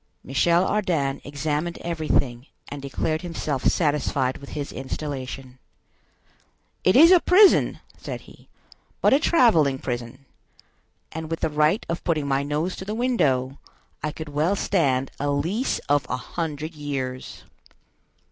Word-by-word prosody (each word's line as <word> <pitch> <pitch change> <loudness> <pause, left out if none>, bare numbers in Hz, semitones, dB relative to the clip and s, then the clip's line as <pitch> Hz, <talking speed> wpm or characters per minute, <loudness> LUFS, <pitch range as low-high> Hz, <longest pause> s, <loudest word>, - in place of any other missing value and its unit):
Michel 170 +7 +2
Ardan 165 -11 0
examined 150 +4 -3
everything, 150 -7 -1 0.2
and 145 0 -7
declared 155 +4 -2
himself 155 -6 -3
satisfied 145 -4 +1
with 140 - -11
his 145 -1 -4
installation. 130 -1 -6 1.2
"It 185 - +4
is 325 +6 +8
a 365 - +8
prison," 380 +4 +5 0.2
said - - -6
he, - - -18 0.5
"but - - +4
a 275 - +5
traveling 210 - +4
prison; 125 +1 -5 0.9
and, 160 0 -6
with 165 - -3
the - - +1
right 150 +6 +2
of 170 - -4
putting 155 -4 0
my 135 0 +1
nose 150 +5 -2
to 190 - -7
the 210 +2 -3
window, 145 - 0 0.4
I 155 - -2
could 155 0 -8
well 155 +7 +1
stand 135 -10 +1
a 145 - -1
lease 170 - 0
of 145 -2 +2
a 125 - -1
hundred 155 +3 -5
years. 135 -4 -5
150 Hz, 140 wpm, -24 LUFS, 135-170 Hz, 1.2 s, is